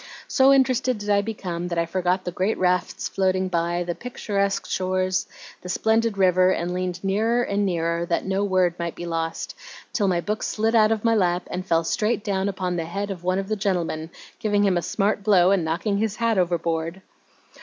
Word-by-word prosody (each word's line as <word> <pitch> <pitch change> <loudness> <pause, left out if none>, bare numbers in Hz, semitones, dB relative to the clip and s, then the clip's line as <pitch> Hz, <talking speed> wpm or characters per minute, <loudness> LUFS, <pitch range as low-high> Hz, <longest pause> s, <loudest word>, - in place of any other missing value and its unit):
So 270 0 +5
interested 255 -2 +3
did 205 0 -3
I 200 0 +4
become 180 -5 -4
that 170 -1 -3
I 170 - +2
forgot 185 +2 -1
the 180 - -2
great 190 +5 -1
rafts 180 -1 0
floating 185 -1 0
by, 175 0 0
the 175 0 -3
picturesque 200 -4 -2
shores, 185 0 0 0.3
the 180 - -8
splendid 220 +2 +1
river, 185 -1 +4
and 180 -1 -1
leaned 180 0 -3
nearer 220 +5 +1
and 200 -2 0
nearer 170 -1 -1
that 170 - 0
no 195 +1 0
word 185 -3 +2
might 170 -1 -3
be 175 - -6
lost, 165 -1 -3 0.4
till 215 -6 +1
my 180 -2 +2
book 210 +5 -3
slid 225 +1 0
out 220 -1 +5
of 220 -2 0
my 230 - +4
lap 180 -4 +1
and 185 +1 -4
fell 165 -1 +2
straight 210 +6 0
down 200 -2 0
upon 185 -2 -2
the 165 - -2
head 200 +4 -4
of 180 -3 -7
one 185 +1 +1
of 195 0 -2
the 215 - -1
gentlemen, 175 -6 -2 0.3
giving 205 -2 +1
him 195 -2 +3
a 175 - +1
smart 200 +5 0
blow, 195 -3 +4
and 195 -4 +2
knocking 190 +6 -1
his 215 -1 -1
hat 230 -3 +1
overboard." 170 0 -1
185 Hz, 205 wpm, -24 LUFS, 175-205 Hz, 0.4 s, So